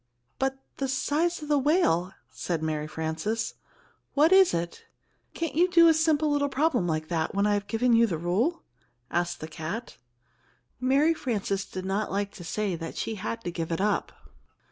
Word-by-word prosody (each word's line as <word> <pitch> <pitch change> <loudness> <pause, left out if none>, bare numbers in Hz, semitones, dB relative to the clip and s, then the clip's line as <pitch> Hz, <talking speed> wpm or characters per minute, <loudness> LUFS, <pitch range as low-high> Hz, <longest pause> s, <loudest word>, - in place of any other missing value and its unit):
"But 270 0 0 0.2
the 270 - -1
size 305 +5 0
of - - -7
the 295 -1 +3
whale 260 - +2
" - - -45
said 165 -3 -3
Mary 155 -1 -2
Frances, 160 +9 -2 0.6
"what 305 +4 +5
is 380 -1 +7
it?" 170 0 -3 0.5
"Can't 330 -4 -2
you 345 +4 +4
do 335 -1 +7
a 325 - +7
simple 315 -1 +2
little 285 0 +1
problem 270 - +1
like 155 -1 -1
that 165 0 -1
when 200 +1 +2
I've 205 -1 +1
given 235 +3 +2
you 230 0 +5
the 170 -6 -2
rule?" 205 - 0 0.5
asked 175 0 -1
the 155 - -5
cat. 165 +8 -6 0.8
Mary 275 +6 +3
Frances 200 -9 -2
did 185 0 -7
not 195 +3 -1
like 200 +1 -2
to 185 - -10
say 195 +2 -2
that 165 0 -7
she 225 - -2
had 230 +3 -5
to 175 - -3
give 165 -1 -4
it 165 - -1
up. 205 0 0
215 Hz, 185 wpm, -27 LUFS, 175-290 Hz, 0.8 s, is